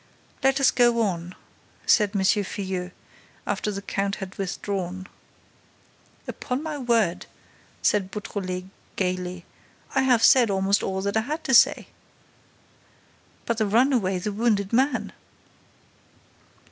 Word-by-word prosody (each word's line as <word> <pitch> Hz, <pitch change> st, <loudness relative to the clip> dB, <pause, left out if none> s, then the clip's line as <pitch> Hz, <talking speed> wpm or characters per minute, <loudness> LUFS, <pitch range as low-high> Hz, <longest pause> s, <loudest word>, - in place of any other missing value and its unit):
"Let 270 Hz, +1 st, +3 dB
us 275 Hz, -, +5 dB
go 240 Hz, -2 st, +3 dB
on," 180 Hz, -3 st, -3 dB, 0.5 s
said 210 Hz, -2 st, +3 dB
M. 195 Hz, -, +1 dB
Filluel 190 Hz, -2 st, -1 dB, 0.6 s
after 205 Hz, +1 st, -2 dB
the 200 Hz, 0 st, -6 dB
count 200 Hz, 0 st, -2 dB
had 190 Hz, -1 st, -8 dB
withdrawn. 190 Hz, -1 st, -4 dB, 1.2 s
"Upon 255 Hz, +3 st, -4 dB
my 310 Hz, -2 st, -4 dB
word," 230 Hz, -8 st, +1 dB, 0.6 s
said 200 Hz, -3 st, +2 dB
Beautrelet, 185 Hz, -3 st, -5 dB, 0.3 s
gaily, 180 Hz, -1 st, -3 dB, 0.5 s
"I 265 Hz, -, +3 dB
have 250 Hz, -4 st, +3 dB
said 245 Hz, -4 st, +6 dB
almost 195 Hz, +1 st, +1 dB
all 190 Hz, 0 st, -3 dB
that 200 Hz, +2 st, 0 dB
I -, -, +3 dB
had 300 Hz, +8 st, -4 dB
to 265 Hz, -, -1 dB
say." 235 Hz, -, +5 dB, 1.6 s
"But 235 Hz, -1 st, -1 dB
the 215 Hz, -, +1 dB
runaway, 225 Hz, -4 st, +2 dB
the 200 Hz, +3 st, -3 dB
wounded 205 Hz, -2 st, 0 dB
man?" 260 Hz, +2 st, +1 dB
205 Hz, 120 wpm, -25 LUFS, 190-240 Hz, 1.6 s, said